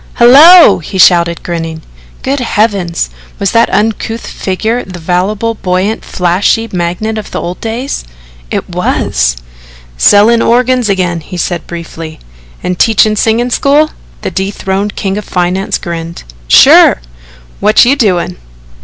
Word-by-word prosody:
"Hello!" 280 - +7
he 180 +3 -7
shouted 170 -2 +3
grinning. 165 -2 -5 0.4
Good 275 +1 -1
Heavens, 205 -7 -1 0.3
was 200 -1 -1
that 230 0 +2
uncouth 225 +1 -2
figure 220 +6 -3
the 185 -1 -10
voluble, 190 +7 -1
buoyant, 195 +1 -2
flashy 185 +6 0
magnate 180 +5 -3
of 210 - -9
the - - -4
old 175 +1 -6
days? 235 +5 -4 0.5
It - - -3
was. - - -1 0.6
"Sellin' 215 - +4
organs 250 -1 +1
agin," 180 -3 -1
he 180 +4 -9
said 175 -1 -3
briefly. 165 -2 -8 0.5
"And 180 -1 -3
teaching 220 -1 +3
singing 230 +3 0
school?" 295 +4 +2 0.3
The - - -3
dethroned 195 +1 -3
king 195 +1 -3
of 210 - -10
finance 180 +2 -1
grinned. 170 0 -7 0.2
"Sure! - - +6 0.6
What 210 +3 +4
you 265 +4 +3
doin'?" 180 - -1
195 Hz, 130 wpm, -10 LUFS, 175-230 Hz, 0.6 s, Hello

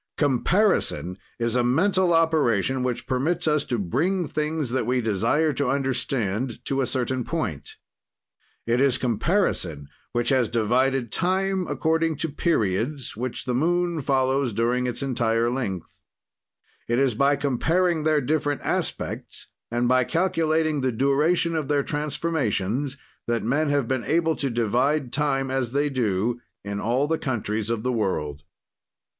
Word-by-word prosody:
"Comparison 140 - +1 0.2
is 115 0 -1
a 125 - +3
mental 180 +8 +2
operation 140 - +2
which 125 -2 -2
permits 140 +7 0
us 150 -1 +2
to 120 - -1
bring 160 - 0
things 150 -3 -2
that 125 -3 -1
we 125 +1 +2
desire 115 +8 +1
to 140 -1 0
understand 125 -4 -1
to 135 0 0
a 130 - 0
certain 130 0 -1
point. - - -4 0.9
"It 120 +2 +1
is 135 -2 +4
comparison 110 - -1 0.2
which 120 -1 0
has 130 -5 +2
divided 120 +2 +1
time 190 +1 0
according 160 0 0
to 165 +3 -3
periods, 130 - -1
which 125 +3 -4
the 125 - -1
moon 170 +4 +1
follows 135 -2 +1
during 120 +3 +1
its 125 +3 -3
entire 120 -3 +1
length. 100 -9 -4 0.9
"It 120 - +1
is 135 -2 +2
by 140 +5 +3
comparing 160 +5 +1
their 155 -1 +2
different 145 +1 0
aspects - - -3 0.2
and 120 +1 0
by 130 +1 +4
calculating 160 -2 +1
the 130 -1 +1
duration 150 +7 +2
of 155 -3 -1
their 145 -1 +1
transformations, 145 - -1 0.3
that 120 -1 0
men 145 +6 +1
have 145 -4 +1
been 130 -1 -1
able 160 0 +2
to 140 - -1
divide 125 +4 0
time 135 -2 0
as 130 -2 -1
they 145 +1 +1
do 115 -1 0 0.3
in 100 0 -3
all 125 +7 +1
the 160 +1 0
countries 110 -4 -2
of 115 -2 -1
the 125 0 0
world. 75 -10 -2
130 Hz, 145 wpm, -24 LUFS, 120-155 Hz, 0.9 s, is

